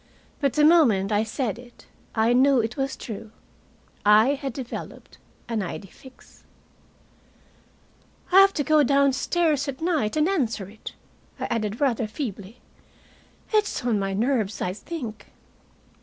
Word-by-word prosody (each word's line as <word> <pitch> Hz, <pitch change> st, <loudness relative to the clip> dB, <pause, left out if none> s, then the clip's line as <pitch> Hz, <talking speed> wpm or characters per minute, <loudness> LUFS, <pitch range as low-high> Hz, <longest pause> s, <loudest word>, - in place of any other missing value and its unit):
But 280 Hz, -3 st, +1 dB
the 300 Hz, +1 st, +4 dB
moment 235 Hz, -, +4 dB
I 210 Hz, 0 st, +2 dB
said 225 Hz, -1 st, -3 dB
it 245 Hz, -1 st, -16 dB, 0.3 s
I 225 Hz, +1 st, +3 dB
knew 265 Hz, +1 st, +4 dB
it 225 Hz, +1 st, -2 dB
was 270 Hz, -1 st, -2 dB
true. 220 Hz, -1 st, -8 dB, 0.7 s
I 210 Hz, +4 st, +6 dB
had 275 Hz, -1 st, -2 dB
developed 250 Hz, 0 st, -8 dB, 0.3 s
an 230 Hz, -3 st, -2 dB
idee 190 Hz, +1 st, -6 dB
fixe. 260 Hz, +6 st, -18 dB, 1.9 s
"I 375 Hz, -, +8 dB
have 390 Hz, 0 st, +6 dB
to 290 Hz, -, -1 dB
go 310 Hz, +1 st, +4 dB
downstairs 285 Hz, +3 st, +2 dB
at 270 Hz, -2 st, -5 dB
night 315 Hz, -8 st, 0 dB
and 305 Hz, +1 st, +3 dB
answer 240 Hz, -, -1 dB
it," 210 Hz, +2 st, -10 dB, 0.5 s
I -, -, -2 dB
added, 215 Hz, -1 st, -2 dB
rather 240 Hz, -6 st, +1 dB
feebly. 215 Hz, -3 st, -6 dB, 0.9 s
"It's 420 Hz, -, 0 dB
on 225 Hz, -4 st, +1 dB
my 195 Hz, 0 st, -2 dB
nerves, 220 Hz, -2 st, 0 dB
I 180 Hz, -, -2 dB
think." 230 Hz, -, -7 dB
245 Hz, 140 wpm, -24 LUFS, 215-285 Hz, 1.9 s, I